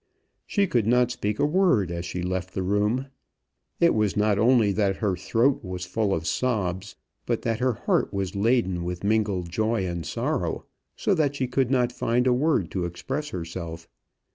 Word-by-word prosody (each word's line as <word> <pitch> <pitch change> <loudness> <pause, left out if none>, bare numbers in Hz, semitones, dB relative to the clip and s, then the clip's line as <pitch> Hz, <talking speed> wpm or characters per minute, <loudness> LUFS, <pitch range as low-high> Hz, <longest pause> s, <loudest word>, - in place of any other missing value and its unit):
She 200 -1 +2
could 120 - +1
not 125 +1 +3
speak 105 -4 -2
a - - +2
word 150 - +2
as 85 +1 -4
she 90 0 -4
left 95 0 -3
the 95 - -1
room. 105 +7 0 0.7
It 170 0 +5
was 105 -3 +1
not 105 -1 +2
only 115 -3 +4
that 100 -1 +1
her 100 -3 0
throat 115 +9 +1
was 90 -2 -5
full 105 +2 -1
of 80 -4 -1
sobs, 100 -5 -1 0.3
but - - -1
that 115 -1 -1
her 130 0 +2
heart - - 0
was 95 -1 -3
laden 100 -4 +1
with 90 +1 -4
mingled 100 -5 0
joy 110 +1 0
and 85 -2 -3
sorrow, 70 - -2 0.3
so 205 - +1
that 150 -5 +1
she 135 - 0
could 125 0 +1
not 125 -2 +2
find 120 +1 0
a 125 - +4
word 125 - +1
to 90 -2 -2
express 135 - -4
herself. 85 - -6
105 Hz, 185 wpm, -25 LUFS, 90-125 Hz, 0.7 s, It